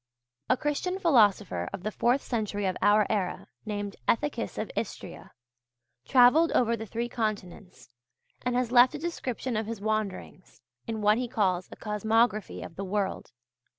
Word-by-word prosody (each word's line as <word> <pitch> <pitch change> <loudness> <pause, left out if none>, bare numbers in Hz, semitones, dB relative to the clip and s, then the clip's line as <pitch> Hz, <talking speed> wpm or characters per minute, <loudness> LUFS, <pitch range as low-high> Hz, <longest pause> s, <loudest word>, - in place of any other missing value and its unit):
A 255 - +4
Christian 295 +7 -2
philosopher 220 - +3
of 195 -2 -7
the 215 - -2
fourth 245 +5 +1
century 210 -4 -2
of 185 -1 0
our 210 0 +5
era, 195 -4 -2 0.2
named 205 -1 -4
Ethicus 295 +6 -1
of - - -4
Istria, - - -6 0.7
travelled 270 +6 +5
over 235 -1 +2
the 225 0 -7
three 235 +3 -3
continents, 205 - -5 0.6
and 250 -1 -1
has 250 -1 0
left 250 +3 +6
a - - -3
description 260 -6 -4
of 215 0 -2
his 225 -2 -5
wanderings, 215 -2 -4 0.2
in 220 -2 -4
what 210 +2 +4
he 250 - -2
calls 185 -5 0
a - - -8
'Cosmography' 220 0 0
of 165 - -12
the 195 - -3
World. 195 +1 -2
220 Hz, 155 wpm, -28 LUFS, 205-250 Hz, 0.7 s, left